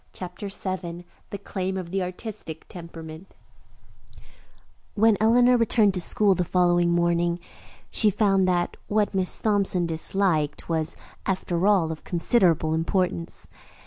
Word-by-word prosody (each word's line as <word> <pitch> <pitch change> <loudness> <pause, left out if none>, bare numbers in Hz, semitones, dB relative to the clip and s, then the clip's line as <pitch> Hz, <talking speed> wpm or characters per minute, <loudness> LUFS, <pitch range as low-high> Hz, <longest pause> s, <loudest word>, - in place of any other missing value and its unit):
CHAPTER 180 +2 -7
VII 180 -3 -5 0.2
THE 200 - -5
CLAIM 190 -1 -4
OF 175 -2 -6
THE 195 0 -1
"ARTISTIC 180 -3 -7
TEMPERAMENT" 165 0 -10 1.6
When 220 0 +4
Eleanor 245 +3 +5
returned 220 -3 +3
to 180 - -2
school 200 +3 +3
the 180 - 0
following 175 0 +2
morning, 170 0 +1 0.5
she 215 - +4
found 195 -2 +2
that 175 -1 0
what 210 0 +1
Miss 190 -2 +1
Thompson 200 -4 +1
"disliked" 160 -2 0
was, 160 -1 -1 0.3
after 185 -1 0
all, 185 -6 +3
of 160 - -8
considerable 170 -4 +2
importance. 165 - -2
180 Hz, 125 wpm, -25 LUFS, 170-200 Hz, 1.6 s, Eleanor